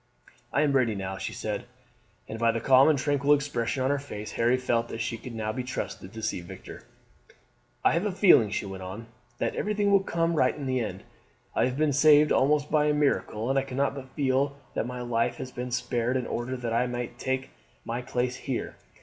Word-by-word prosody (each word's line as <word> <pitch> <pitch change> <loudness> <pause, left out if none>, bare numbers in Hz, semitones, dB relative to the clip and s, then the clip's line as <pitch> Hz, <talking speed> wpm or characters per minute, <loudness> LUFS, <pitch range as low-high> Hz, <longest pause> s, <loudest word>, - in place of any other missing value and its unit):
"I 145 - +2
am 145 - +2
ready 125 -5 +2
now," 95 -1 -4
she - - -4
said, 105 -1 -4 0.6
and 110 - -6
by 115 0 +4
the 115 - -2
calm 130 +5 +6
and 155 - +3
tranquil 145 +1 +3
expression 135 -3 -2
of 130 - +1
her 145 - +1
face 105 -7 -7
Harry 120 +2 +2
felt 120 -2 0
that 115 - -6
she 115 +1 -2
could 115 0 -8 0.2
be 130 - -2
trusted 125 -6 -5
to 110 0 -8
see 110 -5 -1
Victor. 85 - -11 1.0
"I - - +6
have 170 +6 +1
a - - -1
feeling," 180 - +5
she 105 - -2
went 95 -1 -7
on, 95 +5 -7 0.3
"that - - -1
everything 205 -1 0
will 200 -1 +5
come 170 -2 0
right 130 -5 +2
in 145 - -5
the 130 -1 0
end. 115 - -4 0.5
I - - +2
have 125 +1 -2
been 150 -1 +2
saved 150 +1 +6
almost 145 +2 +2
by 150 -1 +3
a 150 - +2
miracle, 135 -6 0
and 135 - +3
I - - -1
cannot 135 +1 -1
but 130 -2 -10
feel 140 0 +1 0.2
that 115 - -1
my 125 0 -5
life 120 -1 0
has 130 - -7
been 125 0 -5
spared 120 +1 0
in 125 - -2
order 125 +2 -3
that 120 -2 -3
I 120 +2 +2
might 120 -1 -5
take 130 0 -2 0.3
my 120 +2 -3
place 125 0 -1
here. 130 -1 -4
130 Hz, 220 wpm, -27 LUFS, 115-145 Hz, 1.0 s, calm